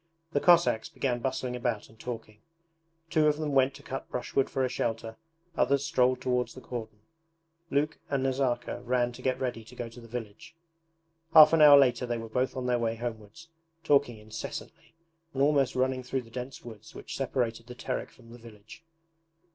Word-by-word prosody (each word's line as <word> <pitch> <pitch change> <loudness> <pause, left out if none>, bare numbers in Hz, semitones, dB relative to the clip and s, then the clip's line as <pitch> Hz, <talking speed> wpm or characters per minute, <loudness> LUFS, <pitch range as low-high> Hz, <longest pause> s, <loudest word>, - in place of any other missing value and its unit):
The 145 - +1
Cossacks 170 -9 +4
began 125 -3 -1
bustling 130 -1 -2
about 120 -3 -2
and 110 - -21
talking. 115 -3 -7 0.7
Two 155 -1 +4
of 150 -1 +2
them 155 -1 -2
went 135 0 +3
to - - -13
cut 135 - -6
brushwood 130 +2 -1
for 135 -1 0
a - - +1
shelter, 115 -2 -3 0.4
others 140 +2 +2
strolled 130 -1 +2
towards 125 -1 -1
the - - -8
cordon. 110 -4 -7 0.7
Luke 150 +1 0
and 140 -2 0
Nazarka 130 -3 -1
ran 120 0 +1
to 120 - -11
get 130 0 0
ready 125 -3 -3
to 120 +3 -15
go 120 -1 -5
to 120 +2 -13
the 115 - -13
village. 115 +3 -8 0.8
Half 155 0 +10
an 165 - +5
hour 145 -1 +10
later 125 -2 +3
they 120 -1 -1
were 115 0 -7
both 125 +3 -1
on 130 - -3
their 125 -1 +1
way 115 -1 0
homewards, 115 +5 -7 0.3
talking 140 -5 +3
incessantly 110 +8 -8 0.4
and 135 - +2
almost 140 -2 +3
running 130 0 +1
through 130 +1 -3
the 115 - -17
dense 125 +1 -7
woods 110 -2 -11
which - - -7
separated 120 -3 -2
the 125 - -9
Terek 125 +1 -4
from 115 -2 -18
the 120 - -12
village. 110 +6 -14
125 Hz, 185 wpm, -29 LUFS, 115-135 Hz, 0.8 s, Half